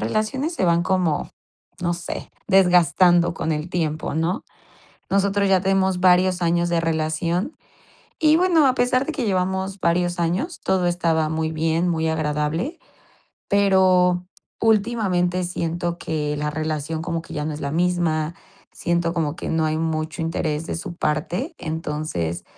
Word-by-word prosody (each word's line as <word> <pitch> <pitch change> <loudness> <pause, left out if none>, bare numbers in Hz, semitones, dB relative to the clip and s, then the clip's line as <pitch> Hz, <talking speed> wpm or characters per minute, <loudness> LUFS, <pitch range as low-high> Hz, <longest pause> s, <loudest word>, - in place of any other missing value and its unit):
relaciones 265 +10 -1
se 190 - 0
van 170 0 +3
como, 180 -5 0 0.5
no 175 0 0
sé, 170 0 -6 0.2
desgastando 175 -2 +4
con 160 - -2
el 155 +3 -4
tiempo, 155 -4 -2
¿no? 165 +6 -1 0.7
Nosotros 200 0 +2
ya 190 -1 +4
tenemos 190 -1 +1
varios 185 0 +4
años 170 +1 +2
de 170 -1 +1
relación 165 - -1 0.6
y, 310 -1 +5
bueno, 340 -4 +4
a 260 - +3
pesar 255 +1 +1
de 320 - -2
que 275 -5 -2
llevamos 190 0 -1
varios 175 +1 +1
años, 185 - -1
todo 185 -2 +1
estaba 165 -3 +1
muy 160 0 -2
bien, 165 +2 0
muy 160 -2 0
agradable, 155 - -1 0.7
pero 185 -3 +3 0.4
últimamente 200 -5 +1
siento 175 0 -2
que 150 -3 -2
la 150 +1 -1
relación 155 +1 -3
como 165 -1 -3
que - - -11
ya 150 -1 -3
no 155 - -2
es 150 - -7
la 140 - -3
misma, 170 -1 0 0.4
siento 170 -1 0
como 160 -3 -1
que - - -6
no 160 -1 +1
hay 155 0 0
mucho 160 0 -2
interés 160 -1 -2
de - - -3
su 175 +1 -6
parte. 170 - -2
Entonces, 150 - -3
175 Hz, 150 wpm, -22 LUFS, 160-190 Hz, 0.7 s, y